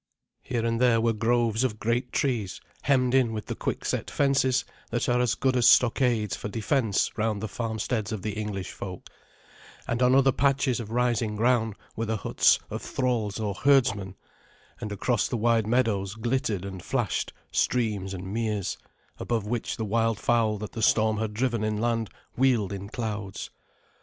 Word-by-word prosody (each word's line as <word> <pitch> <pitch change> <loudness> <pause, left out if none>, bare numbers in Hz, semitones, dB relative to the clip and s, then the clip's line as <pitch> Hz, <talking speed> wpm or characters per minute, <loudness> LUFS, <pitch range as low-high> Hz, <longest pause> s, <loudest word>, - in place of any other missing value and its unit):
Here 120 -2 -2
and 115 +1 0
there 120 -2 +4
were 115 0 +2
groves 115 +1 +1
of 115 -5 -1
great 120 +3 -1
trees, 110 -9 -1 0.2
hemmed 130 -3 +2
in 125 -4 +3
with 110 -1 -4
the - - -4
quickset - - -2
fences 135 -3 +2 0.2
that 120 0 -1
are 125 0 +2
as 125 -1 +1
good 130 0 +1
as 120 -2 +4
stockades 120 -4 +4
for - - -5
defence 110 0 0
round 110 -1 0
the 110 - -3
farmsteads 110 -1 -3
of 110 -4 -4
the 105 - -1
English 105 -2 -4
folk, 90 -2 -8 0.8
and 120 +1 -1
on 125 +1 +5
other 135 0 +5
patches 135 -1 +1
of 110 -3 -6
rising 115 -2 0
ground 115 -1 +2 0.2
were 115 0 -2
the 110 0 0
huts - - +3
of - - -4
thralls 115 -5 -1
or 105 -2 -1
herdsmen, 105 -6 +2 0.6
and 105 - -5
across 105 +3 0
the 120 - -2
wide 115 -1 +2
meadows 110 -5 +1
glittered 115 -4 -1
and 95 -2 -6
flashed 120 -3 -1 0.2
streams 105 -6 0
and 95 -1 -6
meres, 110 -4 -2 0.4
above 115 -3 -1
which 115 +2 -3
the 110 - -2
wildfowl 115 0 +1
that 105 0 -6
the 115 - -5
storm 110 0 +3
had 110 -1 -2
driven 115 0 -1
inland 110 +1 0 0.3
wheeled 120 -7 +2
in 100 0 -6
clouds. 105 -4 -5
115 Hz, 165 wpm, -27 LUFS, 105-125 Hz, 0.8 s, on